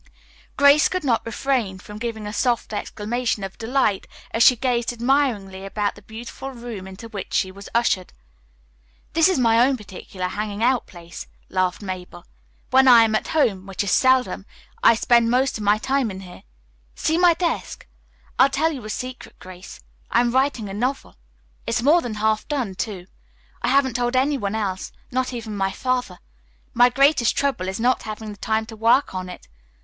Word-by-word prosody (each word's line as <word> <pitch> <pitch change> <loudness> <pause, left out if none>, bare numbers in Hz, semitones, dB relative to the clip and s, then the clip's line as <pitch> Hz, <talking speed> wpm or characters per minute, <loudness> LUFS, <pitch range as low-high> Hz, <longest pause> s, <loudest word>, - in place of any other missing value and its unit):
Grace 285 +2 +6
could 370 -2 -2
not 240 -5 +1
refrain 230 -5 -1
from 210 +2 -10
giving 225 -2 -4
a 210 - -5
soft 240 -2 0
exclamation 220 +1 -2
of 195 0 -7
delight 225 -4 0 0.2
as 225 - -1
she 250 - +7
gazed 240 -1 0
admiringly 235 -6 0
about 205 +1 -2
the 205 - -15
beautiful 230 +5 -8
room 235 -7 -8
into 190 +4 -10
which 210 -4 -7
she 185 - +1
was 200 +1 -11
ushered. 235 -6 +1 1.0
"This 325 +3 +4
is 375 - +1
my 230 -2 +3
own 260 +2 +3
particular 185 -3 -7
hanging 210 +2 -4
out 250 0 +2
place," 170 -2 -10 0.2
laughed 185 +1 -1
Mabel 180 -2 -7 0.5
"When 265 +1 +5
I 235 -2 +8
am 220 -1 +1
at 215 - 0
home, 200 -11 +1
which 195 +1 -3
is 200 - -2
seldom, 260 -1 +2 0.3
I 230 - +6
spend 235 0 +3
most 250 -1 +1
of - - -5
my 205 +1 +3
time 265 +1 0
in 190 -1 -7
here. 180 -2 -12 0.5
See 320 +2 0
my 350 -2 +5
desk! 345 -1 -3 0.5
I'll 265 - +7
tell 310 +4 +1
you 270 -7 -7
a - - -6
secret, 255 +4 -7
Grace. 185 0 -12 0.3
I 235 - +3
am 240 -1 +1
writing 260 -4 +1
a 195 - -7
novel. 255 +7 -3 0.5
It's - - 0
more 320 +6 +5
than 235 -6 -5
half 215 0 0
done, 260 -10 -2
too. 190 -1 -5 0.6
I - - -1
haven't 265 -3 +2
told 245 +1 -1
any 275 +2 +2
one 200 0 -2
else, 195 -4 -3 0.2
not 255 0 -1
even 225 -4 -6
Father. 250 -7 -2 0.6
My 245 +1 +5
greatest 275 -1 +3
trouble 270 -10 0
is 190 +3 -4
not 250 +2 +2
having 215 0 -7
the 205 - -12
time 220 0 0
to 225 0 -10
work 230 +5 +3
on 185 -1 -5
it. 180 - -11
230 Hz, 185 wpm, -22 LUFS, 200-260 Hz, 1.0 s, I